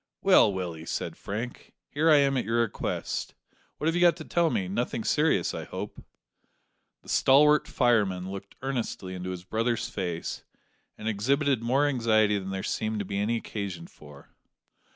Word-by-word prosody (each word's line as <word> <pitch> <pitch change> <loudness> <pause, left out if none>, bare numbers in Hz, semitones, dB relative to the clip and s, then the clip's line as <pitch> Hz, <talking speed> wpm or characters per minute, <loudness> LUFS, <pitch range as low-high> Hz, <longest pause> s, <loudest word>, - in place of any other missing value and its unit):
"Well, 185 - +6
Willie," 85 -4 -5
said - - -3
Frank, 115 +5 -6 0.2
"here 155 +3 +2
I 155 - +8
am 140 -1 +3
at 125 - +1
your 115 +1 +1
request. 115 -3 -3 0.4
What - - -4
have 165 - +2
you 175 - 0
got 175 -1 +5
to 155 - -8
tell 170 -1 +2
me; 95 -10 -1
nothing 115 +3 -2
serious, 150 - +2
I - - -4
hope?" - - -7 1.0
The - - -14
stalwart 150 +3 +5
fireman 100 -7 +1
looked 100 0 -8
earnestly 120 -8 -3
into 90 0 -5
his 90 -1 -6
brother's 115 +4 -1
face, 90 -4 -4 0.5
and 110 - -6
exhibited 135 +5 +1
more 130 +5 +2
anxiety 110 -6 +2
than 95 0 -6
there 95 0 -4
seemed 110 0 -2
to 100 - -3
be 100 +1 -3
any 110 +3 +1
occasion 100 -7 -5
for. 75 -3 -15
110 Hz, 170 wpm, -27 LUFS, 95-135 Hz, 1.0 s, I